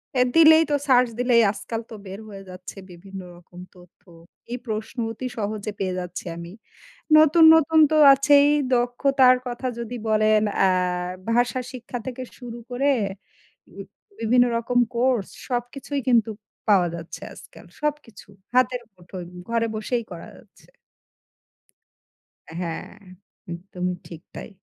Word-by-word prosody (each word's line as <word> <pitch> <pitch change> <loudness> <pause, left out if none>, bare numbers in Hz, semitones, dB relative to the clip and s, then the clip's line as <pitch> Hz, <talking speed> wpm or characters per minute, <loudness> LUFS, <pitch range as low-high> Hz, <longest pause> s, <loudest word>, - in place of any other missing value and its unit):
অ্যা 250 -1 +4
দিলেই 320 0 +8
তো - - +3
সার্চ 250 -1 +5
দিলেই 245 -2 +4
আজকাল 225 +2 -6
তো - - -7
বের 195 +2 -8
হয়ে 195 -1 -10
যাচ্ছে 185 +2 -10
বিভিন্ন 190 +2 -10 0.2
রকম 175 +1 -16 0.2
তথ্য। 180 0 -20 0.5
এই 245 - -2
প্রশ্ন 220 +3 -5
অতি 255 +3 -5
সহজে 210 0 -3
পেয়ে 185 -1 -2
যাচ্ছি 180 +1 -7
আমি। 170 +2 -9 0.6
নতুন, 315 +2 +6
নতুন 320 0 +3
তো - - +2 0.2
আছেই 285 +1 +5 0.3
দক্ষতার 255 +1 +3
কথা 245 +1 -4
যদি 235 +1 -5
বলেন, 215 0 +3 0.2
আ - - +5 0.6
ভাষা 245 +1 +1
শিক্ষা 245 0 -7
থেকে 255 0 -5
শুরু 240 -2 -9
করে 275 +3 +1 0.9
উম - - -7 0.4
বিভিন্ন 245 +2 +4
রকম 245 +1 0 0.2
কোর্স 245 -4 +1 0.2
সবকিছুই 255 +3 -3
কিন্তু 230 -2 +3 0.4
পাওয়া 185 -4 +4
যাচ্ছে 165 0 -9
আজকাল, - - -15 0.2
সবকিছু 295 -10 -4 0.3
হাতের 255 -1 +2
মুঠোয় 180 0 -10 0.2
ঘরে 230 0 0
বসেই 235 +2 -2
করা 170 -1 -9
যাচ্ছে। - - -22 1.8
অ্যা 160 - -11
হ্যাঁ, 165 -2 -5 0.6
একদমই 180 0 -5
ঠিক 165 -2 -11
তাই। - - -8
235 Hz, 135 wpm, -23 LUFS, 195-255 Hz, 1.8 s, দিলেই